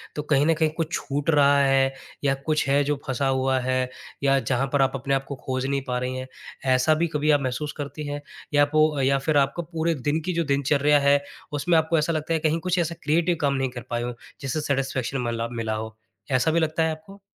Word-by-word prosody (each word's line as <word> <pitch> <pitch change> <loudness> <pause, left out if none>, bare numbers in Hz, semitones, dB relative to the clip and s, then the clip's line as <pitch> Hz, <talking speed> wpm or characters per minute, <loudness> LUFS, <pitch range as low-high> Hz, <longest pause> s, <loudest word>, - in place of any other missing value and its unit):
तो 150 - -2
कहीं 145 -1 +2
न 165 - +4
कहीं 160 -1 +3
कुछ 165 -1 -2
छूट 145 +2 -2
रहा 145 -2 +5
है 135 -1 +3 0.3
या 140 -1 +3
कुछ 155 -2 +1
है, 140 +1 +4
जो 145 +1 0
फँसा 135 +1 0
हुआ 130 0 +1
है 130 0 0 0.4
या 135 0 +4
जहाँ 130 +2 0
पर 145 - +3
आप 135 - +3
अपने 135 +1 -2
आप 135 0 -2
को 140 - -5
खोज 130 0 -1
नहीं 140 0 0
पा 125 - -1
रही 125 0 -3
हैं, 130 0 -5 0.5
ऐसा 130 +5 +3
भी 170 - +3
कभी 150 -1 +1
आप 145 -1 +3
महसूस 135 +3 -2
करती 145 +1 -5
हैं? 145 0 -4 0.3
या 145 0 +5
पो 155 0 +2
या 135 +1 +3
फिर 155 -2 +3
आपको 140 +5 +1
पूरे 165 0 -1
दिन 150 +2 +2
की 180 - -1
जो 170 0 +1
दिनचर्या 145 +1 +3
है, 140 0 +4 0.3
उसमें 165 +4 +2
आपको 160 +1 +2
ऐसा 160 +2 +1
लगता 155 +1 -1
है 160 - +1
कहीं 155 +1 +1
कुछ 180 +2 0
ऐसा 170 0 -1
क्रिएटिव 165 +3 +2
काम 140 -1 +2
नहीं 135 -1 0
कर 125 -1 -7
पाए 120 0 -1
हो? 120 0 -3 0.3
जिससे 135 +3 -2
सैटिस्फैक्शन 135 -2 -1
मला 115 0 -2
मिला 110 -1 -2
हो, 110 0 -6 0.4
ऐसा 130 +4 +3
भी 165 - +2
लगता 160 0 +1
है 160 - +1
आपको? 160 +6 -10
145 Hz, 240 wpm, -24 LUFS, 135-155 Hz, 0.5 s, रहा